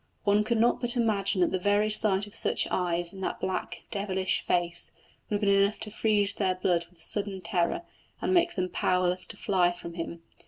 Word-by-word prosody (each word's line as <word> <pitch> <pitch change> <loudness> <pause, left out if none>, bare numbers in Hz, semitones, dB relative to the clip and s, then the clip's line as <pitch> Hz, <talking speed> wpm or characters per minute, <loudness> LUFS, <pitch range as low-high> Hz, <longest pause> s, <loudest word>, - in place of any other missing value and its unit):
One 205 0 +3
could 230 +2 0
not 235 +3 +2
but 240 0 +1
imagine 205 -5 +1
that 175 - +2
the 185 - -1
very 205 +3 +2
sight 205 -2 +6
of 205 - -15
such - - +1
eyes 175 -1 -1
in 190 - -10
that - - -3
black, 185 0 -4
devilish 190 -2 -1
face 175 -1 0 0.4
would 210 - -1
have 205 - -2
been 200 - +2
enough 200 +2 +1
to 210 - -4
freeze 205 -2 +1
their 190 -2 0
blood 175 -2 0
with 170 -2 -14
sudden 200 -2 -1
terror, 180 - -1 0.4
and - - -1
make 345 -1 +2
them 185 -1 -1
powerless 180 0 0
to - - -8
fly 180 -3 +2
from 175 -1 -9
him. 170 0 -6
195 Hz, 205 wpm, -28 LUFS, 180-210 Hz, 0.4 s, sight